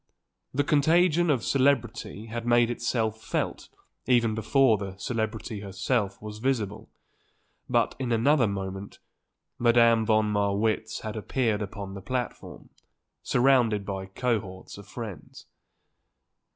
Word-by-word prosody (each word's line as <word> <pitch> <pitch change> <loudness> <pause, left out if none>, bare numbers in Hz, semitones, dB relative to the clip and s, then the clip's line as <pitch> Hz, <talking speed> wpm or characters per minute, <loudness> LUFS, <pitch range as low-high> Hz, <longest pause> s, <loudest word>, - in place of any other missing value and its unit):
The 145 +2 +1
contagion 165 +4 +3
of 130 -8 +2
celebrity 120 -4 0
had 115 +1 -5
made 120 0 +3
itself 115 -2 -1
felt - - -3 0.4
even 120 -3 +3
before 110 +1 +3
the 95 -2 -6
celebrity 110 0 -3
herself 100 +1 -2
was 105 0 -8
visible; 110 -5 -2 0.8
but, - - +2
in 125 -2 -2
another 120 +2 +3
moment, 95 0 -5 0.6
Madame 115 -1 +5
von 110 0 +3
Marwitz 105 +2 0
had 110 -1 -5
appeared 110 0 -1
upon 100 -1 -6
the 100 - -7
platform, 125 +3 -5 0.5
surrounded 120 -5 +3
by 95 -1 -4
cohorts 95 -3 -3
of 100 - -12
friends. 105 -8 -8
110 Hz, 115 wpm, -27 LUFS, 100-125 Hz, 0.8 s, Madame